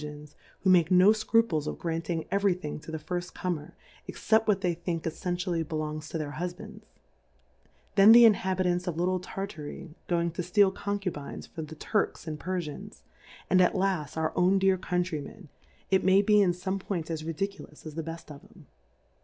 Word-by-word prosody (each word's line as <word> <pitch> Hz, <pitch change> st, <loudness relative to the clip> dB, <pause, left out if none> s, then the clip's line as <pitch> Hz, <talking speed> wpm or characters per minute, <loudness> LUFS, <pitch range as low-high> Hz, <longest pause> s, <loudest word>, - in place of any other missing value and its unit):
iSy 150 Hz, 0 st, -9 dB, 0.3 s
who 190 Hz, -, +2 dB
make 175 Hz, -3 st, +5 dB
no 185 Hz, +3 st, +6 dB
Scruples 215 Hz, -8 st, +1 dB
of -, -, -4 dB
granting 165 Hz, -1 st, -3 dB
every 200 Hz, -2 st, +2 dB
thing 155 Hz, -5 st, -6 dB
to 150 Hz, -, -12 dB
the 160 Hz, -, -3 dB
firft 175 Hz, +3 st, -5 dB
Comer, 165 Hz, -5 st, -4 dB, 0.3 s
except 220 Hz, 0 st, +1 dB
what 200 Hz, -2 st, +2 dB
they 180 Hz, -3 st, +1 dB
think 170 Hz, -1 st, -4 dB
effentially 175 Hz, +1 st, -2 dB
belongs 155 Hz, -1 st, -4 dB
to -, -, -3 dB
their 150 Hz, -2 st, -4 dB
Husbands: 180 Hz, +1 st, -6 dB, 1.1 s
Then 200 Hz, +1 st, +8 dB
the 235 Hz, +1 st, +9 dB
Inhabitants 185 Hz, -4 st, +2 dB
of 170 Hz, -3 st, -2 dB
little 180 Hz, +2 st, +1 dB
Tartar)' 175 Hz, -3 st, -7 dB, 0.2 s
going 170 Hz, -1 st, 0 dB
to 170 Hz, -, -4 dB
fteal 190 Hz, +2 st, +3 dB
Concubines 195 Hz, -8 st, -4 dB
for 165 Hz, -, -8 dB
the 160 Hz, 0 st, -8 dB
Tui 210 Hz, +6 st, +1 dB
ks -, -, -15 dB
and 155 Hz, -2 st, -5 dB
l^erjlans; 175 Hz, -5 st, -5 dB, 0.4 s
and 185 Hz, -, +4 dB
at 180 Hz, -, +4 dB
iaft, 185 Hz, -7 st, -1 dB
our 160 Hz, 0 st, 0 dB
owndear 190 Hz, +1 st, +3 dB
Countrym£n,it 180 Hz, +1 st, -3 dB
may 190 Hz, +2 st, +5 dB
be 210 Hz, 0 st, +5 dB
in 180 Hz, -3 st, +3 dB
fome 190 Hz, +2 st, -3 dB
Points 175 Hz, -4 st, -4 dB
as 160 Hz, -1 st, -3 dB
ridiculous 165 Hz, -1 st, -5 dB
as, 155 Hz, -, -7 dB
the 165 Hz, -, -3 dB
bell: 165 Hz, +1 st, -6 dB
of 145 Hz, +2 st, -11 dB
'em. 200 Hz, -6 st, -18 dB
175 Hz, 175 wpm, -28 LUFS, 160-190 Hz, 1.1 s, the